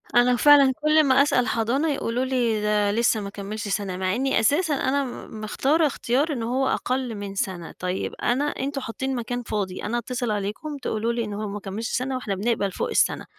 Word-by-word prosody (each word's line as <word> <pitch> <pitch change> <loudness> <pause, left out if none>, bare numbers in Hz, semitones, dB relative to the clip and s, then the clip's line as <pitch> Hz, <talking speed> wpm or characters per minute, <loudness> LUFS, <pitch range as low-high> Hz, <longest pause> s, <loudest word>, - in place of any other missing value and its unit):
أنا 245 +1 +5
فعلًا 280 0 +6
كل 305 +1 +5
ما 270 0 +5
أسأل 250 -4 +2
حضانة 240 +8 +1
يقولوا 250 -1 -1
لي 240 -5 0
ده 210 -1 +2
لسّه 225 +1 +2
ما 200 - -5
كمّلش 205 +1 -6
سَنة، 195 -2 -2
مع 185 +2 0
إنّي 265 -2 +1
أساسًا 295 - +2
أنا 275 +1 +1
م 230 -3 -8
مختارة 290 +9 +2
اختيار 275 +4 0
إن 235 -4 -3
هو 260 +3 0
أقل 255 -3 -1
من 200 -1 -6
سَنة. 185 -3 -3
طيّب 180 +1 -2
أنا 255 +4 +2
أنتم 280 -1 -3
حاطّين 265 +2 -3
مكان 245 +1 -3
فاضي، 200 -5 -3
أنا 230 +3 -1
أتصل 240 -1 -2
عليكم 210 +9 -3
تقولوا 230 -3 -2
لي 235 -1 -1
إن 210 - -5
هو 210 +1 -3
ما 205 +1 -5
كمّلش 205 +4 -5
سَنة 260 +1 -1
واحنا 210 -6 -3
بنقبل 205 -1 0
فوق - - -3
السَنة. - - +1
235 Hz, 200 wpm, -24 LUFS, 210-265 Hz, -, فعلًا